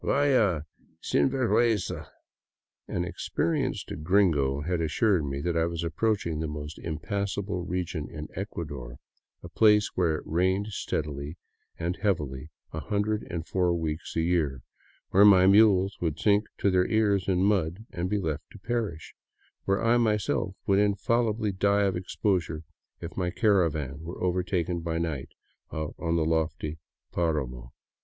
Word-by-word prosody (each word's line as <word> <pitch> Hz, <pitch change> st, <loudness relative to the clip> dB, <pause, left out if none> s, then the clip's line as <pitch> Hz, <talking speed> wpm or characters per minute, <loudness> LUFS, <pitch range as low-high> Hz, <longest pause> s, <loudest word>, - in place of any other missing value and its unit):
Vaya, 120 Hz, -, +3 dB, 0.4 s
sinvergiienza! 120 Hz, -5 st, +1 dB, 0.4 s
" -, -, -65 dB
An 90 Hz, -, 0 dB
experienced 130 Hz, -, -2 dB
gringo 75 Hz, -6 st, +2 dB
had 85 Hz, +2 st, -1 dB
assured 85 Hz, +2 st, +2 dB
me 70 Hz, +1 st, -3 dB
I 85 Hz, -1 st, +2 dB
was 85 Hz, 0 st, -3 dB
approaching 85 Hz, -1 st, 0 dB
the 80 Hz, -, -2 dB
most 75 Hz, 0 st, -6 dB
impassable 95 Hz, +3 st, -3 dB
region 90 Hz, -3 st, -3 dB
in 75 Hz, -2 st, -7 dB
Ecuador, 70 Hz, -, -6 dB, 0.5 s
a -, -, -7 dB
place 105 Hz, +2 st, +4 dB
where 85 Hz, -4 st, +2 dB
it -, -, -5 dB
rained 95 Hz, +5 st, +1 dB
steadily 75 Hz, -5 st, -3 dB, 0.4 s
and 85 Hz, +2 st, -2 dB
heavily 75 Hz, -9 st, -1 dB, 0.2 s
a -, -, -3 dB
hundred 105 Hz, +1 st, -1 dB
and 85 Hz, -2 st, -4 dB
four 90 Hz, -2 st, +1 dB
weeks 80 Hz, 0 st, -4 dB
a 80 Hz, -, +2 dB
year, 80 Hz, -7 st, 0 dB, 0.5 s
where 100 Hz, -, +6 dB
my 95 Hz, -3 st, +8 dB
mules 100 Hz, -1 st, +5 dB
would 80 Hz, -3 st, -1 dB
sink 105 Hz, 0 st, +3 dB
to 100 Hz, -, +2 dB
their 90 Hz, 0 st, +3 dB
ears 105 Hz, -4 st, +2 dB
in 95 Hz, -1 st, +2 dB
mud 100 Hz, 0 st, +1 dB
and 90 Hz, +1 st, -3 dB
be 105 Hz, -, +1 dB
left 80 Hz, -5 st, -2 dB
to -, -, -10 dB
perish, 105 Hz, -6 st, -3 dB, 0.5 s
where 100 Hz, +2 st, +1 dB
I 115 Hz, +1 st, +5 dB
myself 105 Hz, -4 st, 0 dB
would 100 Hz, 0 st, +3 dB
infallibly 105 Hz, +2 st, +1 dB
die 100 Hz, +2 st, +2 dB
of 95 Hz, -2 st, +1 dB
exposure 90 Hz, -3 st, -1 dB, 0.4 s
if 85 Hz, 0 st, -7 dB
my 90 Hz, -2 st, 0 dB
caravan 85 Hz, -, +1 dB
were 85 Hz, +2 st, -7 dB
overtaken 90 Hz, -1 st, 0 dB
by 80 Hz, 0 st, -2 dB
night 80 Hz, -5 st, -3 dB, 0.4 s
out 80 Hz, -1 st, -4 dB
on 85 Hz, -1 st, 0 dB
the 80 Hz, -2 st, +2 dB
lofty 80 Hz, -1 st, -1 dB, 0.3 s
paramo. 65 Hz, -8 st, -2 dB
90 Hz, 145 wpm, -28 LUFS, 80-100 Hz, 0.5 s, my